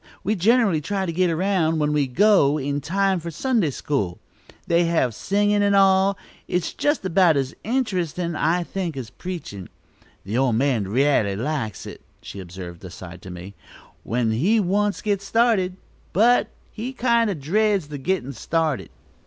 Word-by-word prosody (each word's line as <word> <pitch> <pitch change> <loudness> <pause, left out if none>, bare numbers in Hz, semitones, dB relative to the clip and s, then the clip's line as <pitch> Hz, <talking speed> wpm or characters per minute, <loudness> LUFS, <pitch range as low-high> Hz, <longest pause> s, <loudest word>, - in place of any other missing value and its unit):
We 210 - +1
generally 210 -4 +3
try 195 +4 -2
to 170 - -2
get 180 +1 +2
around, 165 -1 +1
when 150 -1 +1
we 145 -2 +1
go, 150 0 +4
in 145 0 -2
time 190 +4 +1
for 170 +1 -6
Sunday 215 - 0
school. 115 -10 -2 0.5
They 170 +1 +2
have 160 -8 +1
singin' 205 - +1
and 200 0 +3
all. 195 0 +4 0.3
It's 180 -1 -1
just 290 -8 0
about 175 -3 +4
as 135 0 -1
interestin', 180 - -1
I 170 +3 +1
think, 170 -4 -4
as 125 -4 -6
preachin'. 165 - -7 0.5
The 110 +6 -2
old 130 -4 +2
man 125 -4 +1
r'aly 115 -3 +2
likes 115 - -3
it," - - -9 0.2
she 100 - -9
observed 90 -1 -9
aside 90 -1 -10
to 95 - -10
me; 90 +2 -9 0.5
"when 115 -1 0
he 180 - +2
once 205 +1 0
gets 200 -2 0
started, 200 -4 +1 0.4
but 235 +5 +4 0.2
he 240 +4 -5
kind 235 -3 +2
o' 200 - -1
dreads 190 +3 0
the 145 -2 -6
gittin' 140 -3 -2
started." 155 +3 -1
170 Hz, 160 wpm, -23 LUFS, 135-200 Hz, 0.5 s, go